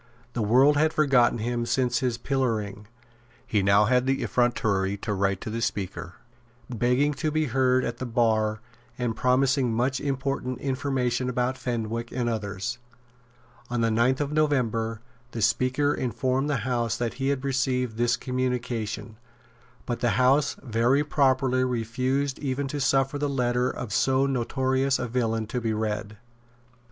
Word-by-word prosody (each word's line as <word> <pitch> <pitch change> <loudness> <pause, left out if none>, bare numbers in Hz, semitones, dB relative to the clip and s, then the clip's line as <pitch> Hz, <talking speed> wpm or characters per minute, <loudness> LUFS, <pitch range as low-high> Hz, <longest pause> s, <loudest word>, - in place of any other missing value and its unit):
The 120 - -2
world 130 +7 +4
had 155 +1 +2
forgotten 135 -6 +3
him 120 +1 -2
since 125 -2 +1
his 125 -3 -1
pillorying. 110 -6 -2 0.6
He 105 - +1
now 100 +2 +4
had 125 +3 +2
the 135 0 +1
effrontery 100 -5 +1
to 105 +1 -3
write 100 -1 0
to 110 - -5
the 115 +1 -3
Speaker, 95 -5 -3 0.5
begging 125 +5 +1
to 145 +3 -2
be 155 0 0
heard 130 0 +2
at 120 0 -4
the 130 - -4
bar 110 -2 +1 0.4
and 120 -2 -2
promising 130 +1 +2
much 125 +3 0
important 135 -2 -2
information 130 -2 -1
about 125 +1 0
Fenwick 115 -2 -3
and 120 -1 -2
others. 110 +1 -3 0.9
On 120 -1 -1
the 115 -1 +2
ninth 120 +4 +2
of 145 -1 -1
November 115 -7 0 0.3
the 115 - -4
Speaker 130 +6 +2
informed 130 +2 -1
the 140 - +1
House 120 -3 0
that 120 -2 -2
he 135 - +1
had 140 -1 0
received 125 -3 0
this 120 +1 +2
communication; 120 -4 -3 0.7
but 120 -1 -3
the 120 -4 +1
House 135 +3 +3
very 120 +3 +2
properly 130 -3 +2
refused 130 +3 -1
even 140 0 -2
to 145 0 -3
suffer 135 +1 +1
the 145 0 0
letter 125 -2 +1
of 115 -5 -5
so 135 +3 +2
notorious 130 +1 0
a 125 - -3
villain 115 -2 -1
to 120 +3 -3
be 115 -1 -1
read. 105 -1 -3
125 Hz, 155 wpm, -26 LUFS, 115-135 Hz, 0.9 s, world